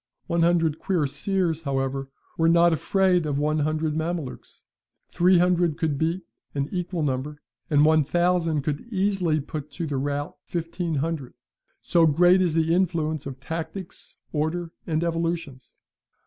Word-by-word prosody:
One 170 0 0
hundred 165 -2 +2
cuirassiers, 175 0 0
however 135 -2 -2 0.3
were 165 0 +3
not 170 0 +5
afraid 180 0 +2
of 145 -2 -1
one 150 +1 +1
hundred 155 +1 0
Mamelukes; 160 -3 -4 0.5
three 180 +1 +4
hundred 175 -3 +2
could 155 -4 -1
beat; 165 +3 0 0.3
an 140 0 0
equal 180 -2 -2
number, 145 +2 -2 0.3
and 150 -1 +5
one 155 0 +5
thousand 170 -1 +1
could 145 0 -2
easily 190 -6 +1
put 150 +1 -6
to 170 +3 -3
the 145 -3 -2
rout 145 +2 -3
fifteen 170 -1 -3
hundred, 150 -2 -3 0.5
so 170 -2 +4
great 175 +5 +5
is 170 -4 +1
the 165 0 +2
influence 160 -5 0
of 135 -1 -7
tactics, 165 +5 -7 0.2
order, 165 +3 -1 0.2
and 160 -1 0
evolutions! 165 -5 -3
160 Hz, 145 wpm, -25 LUFS, 150-175 Hz, 0.5 s, not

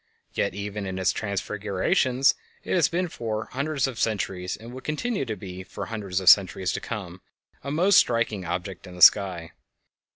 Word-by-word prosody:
Yet - - -1
even 100 0 -5
in 95 0 -4
its 95 -1 +2
transfigurations 105 +6 +1 0.3
it - - -3
has 175 -5 +4
been 180 +1 -1
for 110 -8 -4
hundreds 140 +1 -1
of 130 -4 -5
centuries, 95 -4 -2
and 115 +2 -11
will 130 - -8
continue 155 - -2
to 110 -3 -4
be 90 -1 -8
for - - -7
hundreds 100 -4 -3
of 95 - -7
centuries 95 -1 +5
to - - -3
come, 95 -5 -6 0.4
a 140 - -5
most 180 +7 +4
striking 115 -5 0
object 90 +2 -5
in 90 - -11
the 90 - +2
sky. 90 -5 +5
105 Hz, 175 wpm, -25 LUFS, 95-130 Hz, 0.4 s, centuries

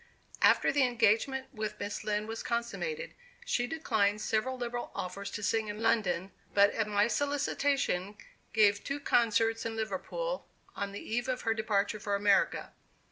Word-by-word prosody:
After - - +5
the 285 - +2
engagement 255 +2 +2
with 215 -2 -4
Miss 205 - -4
Lind 210 0 -1
was 225 0 -4
consummated, 460 - -3 0.3
she 245 - 0
declined 220 -9 +1
several 225 +5 -1
liberal 240 -1 -4
offers 195 +2 -4
to 210 - -6
sing 220 +1 +1
in 210 0 -5
London, 210 -5 +1 0.2
but, 200 0 +6
at 220 -2 -1
my 205 0 +3
solicitation, 275 -6 0 0.3
gave 205 -1 +4
two 280 +1 -3
concerts 225 -4 +2
in 225 -1 -3
Liverpool, 225 - -3 0.3
on 200 0 -3
the 200 - -8
eve 240 +3 -1
of 255 0 -1
her 225 - +1
departure 215 -1 0
for 205 -1 -1
America. 200 0 +2
220 Hz, 155 wpm, -31 LUFS, 205-245 Hz, 0.3 s, but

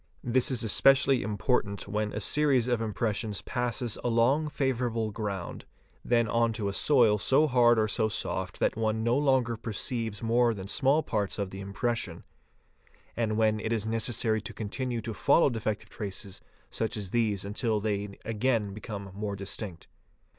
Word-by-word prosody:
This 125 +1 +2
is 125 -4 -1
especially 135 +3 +4
important 105 -1 -1
when 105 0 -2
a 105 - -3
series 135 0 +2
of 120 -2 +1
impressions 110 -1 -2
passes 120 -2 -2
along 125 +6 +2
favourable 125 -6 -1
ground, 100 -4 -5 0.4
then 115 -1 +2
on 115 +1 +1
to 105 -2 -3
a - - -4
soil 115 -3 +4
so 135 +8 +4
hard 120 -4 +4
or 110 -1 +2
so 110 +1 0
soft 95 -2 -3
that - - +1
one 110 0 -1
no 120 +1 +2
longer 130 -4 +2
perceives 115 0 -3
more 115 0 +3
than 95 -1 -7
small 135 +9 +3
parts 105 -3 -2
of 100 -2 -3
the 95 - -7
impression, 105 +4 -3 0.9
and 110 -2 -1
when 110 -1 +2
it 110 - -3
is 110 -2 0
neces 115 +2 -1
sary 110 -1 0
to - - -8
continue 120 +2 -3
to 110 +1 -5
follow 140 +7 +3
defective 110 -2 -3
traces 100 -1 -6 0.3
such 110 0 -2
as 100 -3 -5
these 105 -5 0
until 110 +1 -1
they 100 -1 -3
again 115 -2 0
become 100 -2 -7
more 100 0 -4
distinct. 100 -2 -6
110 Hz, 165 wpm, -28 LUFS, 105-120 Hz, 0.9 s, especially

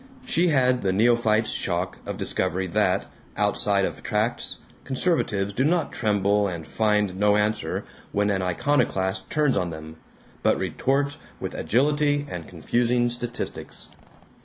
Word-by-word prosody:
She 175 +2 +2
had 130 -5 +3
the 95 - +1
neophyte's 110 +1 +3
shock 90 +1 -2
of - - -4
discovery 95 0 -1
that, 85 - +1 0.3
outside - - +2
of - - -5
tracts, - - -1 0.3
conservatives 125 - 0
do 130 - +1
not 165 +1 +1
tremble 105 -2 +2
and 85 -4 -5
find 105 +1 +1
no 105 0 +4
answer 105 +1 -1 0.3
when 105 0 +1
an 95 -1 0
iconoclast 95 - 0
turns 150 -3 +2
on 90 - 0
them, 80 0 -8 0.4
but - - +3
retort 140 +2 0 0.2
with - - -4
agility 145 +3 +1
and 85 -2 -6
confusing 120 +7 +1
statistics. 120 0 -4
105 Hz, 135 wpm, -25 LUFS, 95-130 Hz, 0.4 s, no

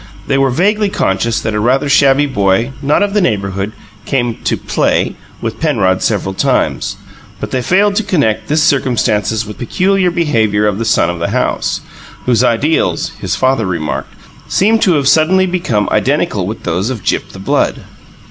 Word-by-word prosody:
They 135 -1 +1
were 135 0 +3
vaguely 205 - +1
conscious 110 - 0
that 110 - -2
a 105 - 0
rather 130 +6 +1
shabby 140 0 +4
boy, 105 -1 +1
not 150 +7 +2
of 205 -1 -1
the 210 - +2
neighbourhood, 100 - -1 0.3
came 120 -3 -1
to - - +1
"play" - - 0 0.3
with 115 -1 -4
Penrod 100 -12 +1
several 100 -3 -1
times; - - 0 0.4
but - - -5
they 130 - 0
failed 200 - +2
to 225 - +1
connect 150 - 0
this 155 +1 +2
circumstance 125 -8 +1
with 105 -1 -9
the - - -4
peculiar 190 - +2
behaviour 115 - +1
of 105 -1 0
the 115 - -2
son 110 -6 +2
of 85 - -7
the 85 - -1
house, - - -1 0.4
whose 125 -1 +2
ideals 150 +6 +1
(his 95 -2 -2
father 130 -5 +1
remarked) 80 -4 -4 0.3
seemed 220 +3 +2
to 185 -5 +4
have 140 -3 +1
suddenly 175 +6 +4
become 170 - -1
identical 115 - 0
with 110 - -6
those 90 +5 -1
of 115 -7 -5
Gyp - - -1
the - - -12
Blood. 95 - -1
125 Hz, 175 wpm, -14 LUFS, 105-160 Hz, 0.4 s, shabby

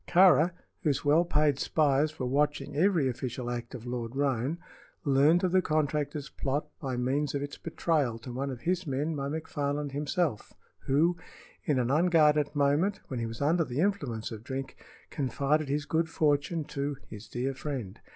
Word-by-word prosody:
Kāra, 175 -2 +6 0.3
whose 145 -4 0
well 150 +4 +5
paid 150 -5 +2
spies 150 0 +2
were 130 - -2
watching 145 +2 0
every 170 -3 +3
official 125 -1 -3
act 120 0 -5
of 120 -1 -8
Lord 120 0 -4
Roane, 135 +2 0 0.5
learned 145 +6 +4
of 185 - +2
the 185 0 +4
contractor's 150 -2 -1
plot 145 +1 -2
by 130 -3 -3
means 135 +4 0
of 140 - -1
its 145 - -6
betrayal 155 -7 0
to 120 +2 -8
one 135 +3 -2
of 125 -3 -6
his 180 +2 -1
men 145 +4 -1
by 140 -1 -3
McFarland 145 -2 -2
himself, 150 - -1 0.3
who, 165 +6 +3 0.5
in 145 - +2
an 125 0 +1
unguarded 150 -2 +4
moment, 145 +8 +2
when 130 - -3
he 115 - -2
was 115 +4 -4
under 165 +4 +3
the 130 -2 -4
influence 145 - -1
of 110 -1 -7
drink, 130 +2 -5 0.4
confided 145 +2 0
his 145 +1 -1
good 160 +1 0
fortune 155 +1 +1
to 140 0 -3
"his 105 0 -10
dear 125 +7 -2
friend." 130 -8 -5
145 Hz, 170 wpm, -29 LUFS, 130-155 Hz, 0.5 s, Kāra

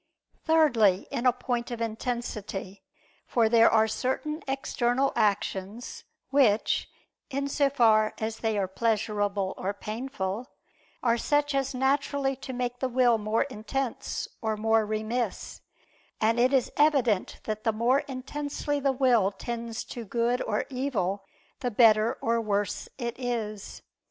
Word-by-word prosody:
Thirdly, 240 - +4
in 250 -2 +3
point 245 -1 -3
of 240 -2 -5
intensity: 215 -4 -4 0.5
for 230 -2 +3
there 230 0 +6
are 220 0 +4
certain 260 +8 -2
external 270 -1 0
actions, 200 +2 -1 0.3
which, 245 -7 +3 0.4
in 280 0 -2
so 280 0 +2
far 220 -5 +3
as 220 0 -3
they 220 -2 0
are 195 -2 0
pleasurable, 205 -2 0
or 195 +2 -3
painful, 215 0 -4 0.6
are 235 -1 +2
such 290 +2 +1
as 270 -1 -1
naturally 270 +1 +1
to 265 - -7
make 245 -1 -3
the 260 - -1
will 245 -2 +3
more 215 +2 +1
intense 260 0 -4
or 220 -1 -1
more 220 0 +2
remiss; 215 +1 -3 0.6
and 225 +2 +2
it 250 +2 +4
is 265 -3 +2
evident 270 -9 +2
that 215 0 -4
the 225 - +2
more 235 +5 +2
intensely 285 +2 -3
the 275 -1 +2
will 250 -7 +3
tends 235 +2 -5
to 240 - -7
good 235 +3 0
or 210 -1 -1
evil, 205 -8 -1 0.4
the 250 -2 -1
better 220 -1 +4
or 230 0 +2
worse 205 -2 -2
it 240 -1 -4
is. 225 -5 -4
235 Hz, 135 wpm, -27 LUFS, 215-260 Hz, 0.6 s, there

